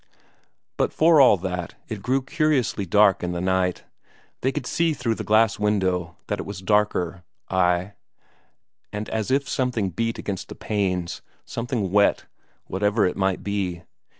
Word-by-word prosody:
But - - +1
for 160 -2 +5
all 125 -6 +7
that, 90 -1 -4
it 110 -3 -6
grew 130 +4 0
curiously 135 - 0
dark 100 +1 +4
in 90 0 -2
the 85 - -3
night. 95 0 0 0.6
They 130 - +1
could 125 - -4
see 165 +2 +1
through 115 -4 -1
the - - -5
glass 110 -1 +3
window 95 -5 0
that - - -3
it - - -4
was 100 -2 -6
darker 95 -3 +1 0.3
ay, 90 +1 +1 1.0
and 105 +1 -4
as 110 0 -2
if 140 +1 +1
something 120 -8 -1
beat 115 +6 -2
against 95 -3 -5
the - - -8
panes, 90 -5 -2 0.2
something 115 -5 -3
wet, 100 +1 +3 0.4
whatever 105 +3 +1
it 90 - 0
might 95 -1 0
be. 95 -4 -2
100 Hz, 155 wpm, -24 LUFS, 90-115 Hz, 1.0 s, all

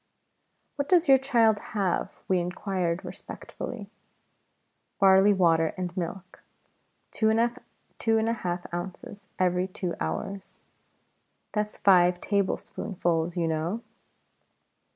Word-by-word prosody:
"What 285 0 -2
does 350 -3 +4
your 270 -1 +7
child 230 -5 +3 0.2
have?" 190 -4 -1
we 185 -1 +2
inquired 180 0 -2
respectfully. 200 +3 -8 1.1
"Barley 195 +1 +6
water 165 -4 +3
and 180 -1 -4
milk, 185 +1 -6 0.7
two 220 - +2
and 225 0 -1
a 230 - +2
half 175 -5 -4
ounces 195 +4 -7
every 180 0 +1
two 185 -2 -4
hours 190 - -5 0.9
that's 210 0 -2
five 180 -2 +5
tablespoonfuls, 175 -4 -1
you 170 -1 +1
know." 165 +8 -2
190 Hz, 100 wpm, -27 LUFS, 175-215 Hz, 1.1 s, your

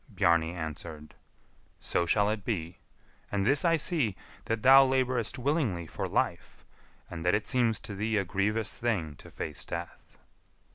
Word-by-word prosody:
Bjarni 85 -5 +2
answered, 80 -2 -7 0.7
"So 85 - 0
shall 105 +4 +3
it 110 -2 -4
be; 85 -6 -4 0.5
and 100 -1 0
this 140 +4 +3
I 165 -1 +4
see, 150 - +1 0.3
that 115 -1 -2
thou 135 +1 +9
labourest 130 -3 0
willingly 125 - -1
for - - -4
life, - - -2 0.5
and 80 -2 -6
that 90 +3 +3
it 105 - -1
seems 120 -4 +1
to 105 - -7
thee 105 +2 -1
a 100 - 0
grievous 105 +4 0
thing 100 -11 -1
to - - -13
face - - -4
death." - - -8
105 Hz, 155 wpm, -29 LUFS, 85-125 Hz, 0.7 s, thou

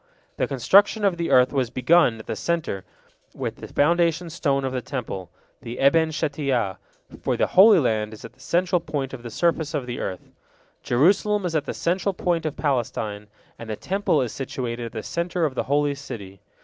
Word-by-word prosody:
The - - 0
construction 200 - +4
of 190 -3 +2
the 170 0 -2
earth 125 +1 +5
was 130 -4 0
begun 130 -1 +3
at 110 - -11
the - - -3
centre, 165 - -2 0.5
with - - -4
the - - -9
foundation 170 +2 +1
stone 140 -4 0
of 130 - -2
the 130 - -2
Temple, 115 - -5 0.3
the 115 +2 -7
Eben 160 +4 +4
Shetiyah, 140 - -1 0.4
for - - 0
the - - +3
Holy 200 +2 +7
Land 110 -7 0
is 110 - -10
at 115 - -11
the 130 - -30
central 180 +5 +1
point 140 -5 -4
of 130 - -7
the 120 - -7
surface 160 +3 0
of 140 -4 -2
the 120 -1 -5
earth, 90 -1 -5 0.5
Jerusalem 195 - +2
is 165 -2 -2
at 150 -2 0
the - - -4
central 185 +3 0
point 175 -6 0
of 150 - -5
Palestine, 110 -7 -2 0.3
and 115 - -8
the 110 - -2
Temple 190 - 0
is 120 - -4
situated 125 -3 -4
at - - -10
the 110 -2 -5
centre 170 0 -1
of 145 - -1
the - - -2
Holy 145 0 +2
City. 100 -9 -9
140 Hz, 200 wpm, -24 LUFS, 120-170 Hz, 0.5 s, Holy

